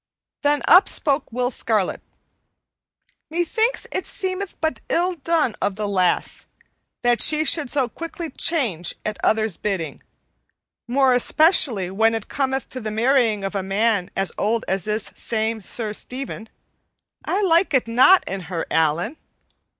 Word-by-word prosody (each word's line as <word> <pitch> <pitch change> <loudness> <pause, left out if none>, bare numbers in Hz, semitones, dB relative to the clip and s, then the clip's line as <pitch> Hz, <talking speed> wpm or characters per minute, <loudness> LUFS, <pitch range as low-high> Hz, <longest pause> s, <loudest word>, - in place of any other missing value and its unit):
Then 290 0 +1
up 365 +3 +7
spoke 285 -4 -1
Will 250 +2 -1
Scarlet. 215 -6 -1 1.3
"Methinks 350 +9 0
it 370 - -3
seemeth 375 0 -4
but 315 0 -2
ill 360 +2 +1
done 310 -5 0
of 200 - 0
the 210 0 -3
lass 185 -3 0 0.6
that 240 0 +3
she 310 0 +2
should 300 -4 +1
so 270 -1 +2
quickly 330 +4 -7
change 230 - -1
at 215 -1 -4
others' 220 -4 +1
bidding, 170 -8 -3 0.9
more 260 +1 +3
especially 245 - +3
when 225 +3 +2
it 225 - -5
cometh 265 -1 -2
to 260 - -6
the 220 -3 -4
marrying 225 -2 +2
of 195 - -3
a 200 - -1
man 195 0 0
as 195 -1 0
old 225 +2 0
as 190 +1 -1
this 215 0 -2
same 220 -1 -2
Sir 215 +1 -4
Stephen. 250 -2 -6 0.7
I 385 - -1
like 335 -3 +3
it 255 - +2
not 260 +12 +5
in 195 0 -4
her, 170 -3 -3
Allan." 160 - +1
235 Hz, 145 wpm, -22 LUFS, 210-305 Hz, 1.3 s, up